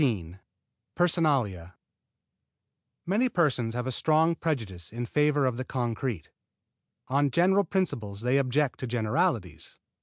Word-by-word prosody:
XIII 95 Hz, -, -1 dB, 0.6 s
PERSONALIA 135 Hz, -, +1 dB, 1.3 s
Many 215 Hz, +8 st, +2 dB
persons 130 Hz, -, 0 dB
have 125 Hz, 0 st, -2 dB
a 130 Hz, -, -2 dB
strong 160 Hz, +5 st, +2 dB
prejudice 110 Hz, -, -4 dB
in 120 Hz, +2 st, -4 dB
favor 150 Hz, +1 st, +2 dB
of 125 Hz, -2 st, 0 dB
the 130 Hz, -, -3 dB
concrete. 120 Hz, -6 st, -3 dB, 0.8 s
On 140 Hz, +2 st, +2 dB
general 190 Hz, +7 st, +3 dB
principles 140 Hz, -, -2 dB
they 125 Hz, +3 st, +2 dB
object 135 Hz, +1 st, 0 dB
to 130 Hz, -, -4 dB
generalities. 110 Hz, -7 st, -1 dB
130 Hz, 120 wpm, -28 LUFS, 110-155 Hz, 1.3 s, general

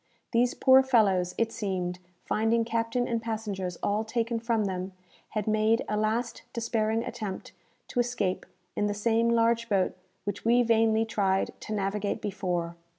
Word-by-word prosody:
These 245 Hz, +2 st, +2 dB
poor 265 Hz, 0 st, +6 dB
fellows, 195 Hz, -9 st, +2 dB
it 230 Hz, -1 st, +1 dB
seemed, 185 Hz, -5 st, -3 dB, 0.3 s
finding 225 Hz, +1 st, +1 dB
captain 230 Hz, +1 st, 0 dB
and 230 Hz, -1 st, -1 dB
passengers 210 Hz, -6 st, -3 dB
all 210 Hz, +2 st, +1 dB
taken 230 Hz, +1 st, -1 dB
from 225 Hz, -2 st, 0 dB
them, 185 Hz, 0 st, -3 dB, 0.4 s
had 215 Hz, -2 st, -2 dB
made 215 Hz, +1 st, +2 dB
a 210 Hz, -, -1 dB
last 215 Hz, +3 st, -1 dB
despairing 225 Hz, -1 st, 0 dB
attempt 215 Hz, -6 st, -5 dB, 0.4 s
to 245 Hz, -, -2 dB
escape 235 Hz, -6 st, -1 dB, 0.3 s
in 205 Hz, -, +1 dB
the 205 Hz, -, -2 dB
same 230 Hz, +2 st, +2 dB
large 230 Hz, 0 st, +2 dB
boat 195 Hz, -3 st, +1 dB, 0.3 s
which 205 Hz, 0 st, -4 dB
we 240 Hz, +2 st, +4 dB
vainly 225 Hz, -1 st, +3 dB
tried 195 Hz, -3 st, +1 dB
to 215 Hz, -, -6 dB
navigate 200 Hz, 0 st, -1 dB
before. 180 Hz, -4 st, -2 dB
220 Hz, 150 wpm, -28 LUFS, 200-230 Hz, 0.4 s, poor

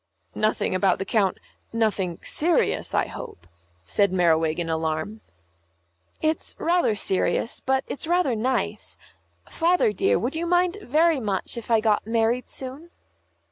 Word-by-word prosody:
"Nothing 215 Hz, -2 st, 0 dB
about 185 Hz, 0 st, +2 dB
the 195 Hz, -, -4 dB
Coun 200 Hz, -3 st, +1 dB, 0.4 s
nothing 205 Hz, -6 st, 0 dB
serious, 330 Hz, +1 st, +1 dB
I -, -, +3 dB
hope," 85 Hz, -, -9 dB, 0.4 s
said 200 Hz, -, +2 dB
Merriwig, 165 Hz, -3 st, +2 dB
in 170 Hz, -1 st, -2 dB
alarm. 160 Hz, +6 st, -2 dB, 1.0 s
"It's 315 Hz, 0 st, -1 dB
rather 340 Hz, -9 st, +2 dB
serious, 200 Hz, +3 st, 0 dB
but 265 Hz, +1 st, 0 dB
it's 300 Hz, -, -5 dB
rather 345 Hz, -8 st, +2 dB
nice. 250 Hz, +4 st, -2 dB, 0.5 s
Father, 340 Hz, -9 st, +2 dB
dear, -, -, +2 dB
would 245 Hz, +7 st, -2 dB
you 335 Hz, +2 st, -2 dB
mind 355 Hz, +3 st, +2 dB
very 315 Hz, 0 st, +3 dB
much 205 Hz, -3 st, -2 dB
if 235 Hz, -1 st, -8 dB
I 225 Hz, -2 st, +4 dB
got 215 Hz, -1 st, +1 dB
married 230 Hz, +2 st, +1 dB
soon?" 270 Hz, +6 st, -7 dB
225 Hz, 140 wpm, -24 LUFS, 190-310 Hz, 1.0 s, I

